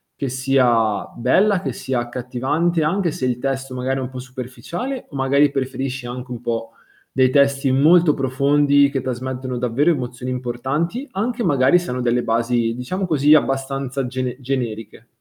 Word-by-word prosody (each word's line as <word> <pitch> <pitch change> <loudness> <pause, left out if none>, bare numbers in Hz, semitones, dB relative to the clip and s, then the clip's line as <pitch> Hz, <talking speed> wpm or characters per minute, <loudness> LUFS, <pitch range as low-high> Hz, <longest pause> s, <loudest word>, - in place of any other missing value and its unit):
che 135 - -3
sia 125 -5 +2
bella, 195 - +3
che - - -2
sia 130 -1 -3
accattivante, 130 +8 -1
anche 180 +3 +1
se 130 - -3
il 125 -1 -1
testo 135 -1 -3
magari 130 +1 -2
è - - -2
un 125 - -4
po' 130 -1 -8
superficiale, 130 - -6
o 140 - -11
magari 140 +2 +3
preferisci 135 -1 -3
anche 125 +1 -7
un 120 - -6
po' 115 -1 -3 0.4
dei 130 -1 +3
testi 140 -1 +3
molto 155 +3 +5
profondi, 140 +2 +3
che 135 - -1
trasmettono 130 0 -4
davvero 125 +6 +1
emozioni 125 -4 -2
importanti, 135 - -3
anche 235 +3 -2
magari 140 +2 +4
se 175 - -5
hanno 125 0 -2
delle 120 0 +1
basi, 115 0 0
diciamo 185 +11 -3
così, 150 -2 +4
abbastanza 135 -2 0
gene 130 0 -3
generiche? 120 -5 -4
130 Hz, 160 wpm, -21 LUFS, 125-145 Hz, 0.4 s, molto